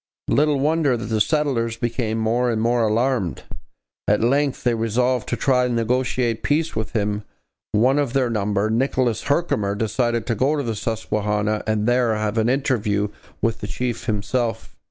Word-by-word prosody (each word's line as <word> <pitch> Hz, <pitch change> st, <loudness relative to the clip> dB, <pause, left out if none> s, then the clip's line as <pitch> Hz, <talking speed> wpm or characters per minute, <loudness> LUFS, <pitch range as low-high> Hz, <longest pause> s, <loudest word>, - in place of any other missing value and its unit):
Little 150 Hz, -1 st, +3 dB
wonder 150 Hz, -3 st, +2 dB
that 115 Hz, -, -5 dB
the 110 Hz, -1 st, 0 dB
settlers 120 Hz, -5 st, 0 dB
became 115 Hz, -1 st, -2 dB
more 115 Hz, +3 st, +1 dB
and 115 Hz, -2 st, 0 dB
more 120 Hz, +2 st, +2 dB
alarmed. 115 Hz, -4 st, 0 dB, 0.6 s
At 105 Hz, +1 st, +2 dB
length 140 Hz, +3 st, +1 dB
they 120 Hz, -, +2 dB
resolved 120 Hz, +2 st, 0 dB
to -, -, 0 dB
try 125 Hz, -2 st, +2 dB
to -, -, -2 dB
negotiate 120 Hz, 0 st, 0 dB
peace 155 Hz, +3 st, 0 dB
with 110 Hz, +1 st, -3 dB
him. 105 Hz, -2 st, 0 dB, 0.5 s
One 125 Hz, +7 st, +3 dB
of 140 Hz, -4 st, -1 dB
their 130 Hz, -3 st, +1 dB
number, 105 Hz, 0 st, 0 dB
Nicholas 125 Hz, -1 st, +1 dB
Herkimer, 125 Hz, -10 st, 0 dB
decided 115 Hz, +2 st, 0 dB
to 120 Hz, -, 0 dB
go 135 Hz, +6 st, +1 dB
to 145 Hz, -, -1 dB
the 115 Hz, -3 st, -2 dB
Susquehanna 105 Hz, -1 st, -1 dB
and 110 Hz, -1 st, +1 dB
there 120 Hz, -2 st, +2 dB
have 110 Hz, +1 st, -1 dB
an 110 Hz, +2 st, +2 dB
interview 110 Hz, -6 st, 0 dB, 0.3 s
with 115 Hz, -1 st, 0 dB
the 105 Hz, -, -4 dB
chief 120 Hz, +1 st, -3 dB
himself. 115 Hz, +2 st, -2 dB
115 Hz, 170 wpm, -22 LUFS, 110-130 Hz, 0.6 s, Little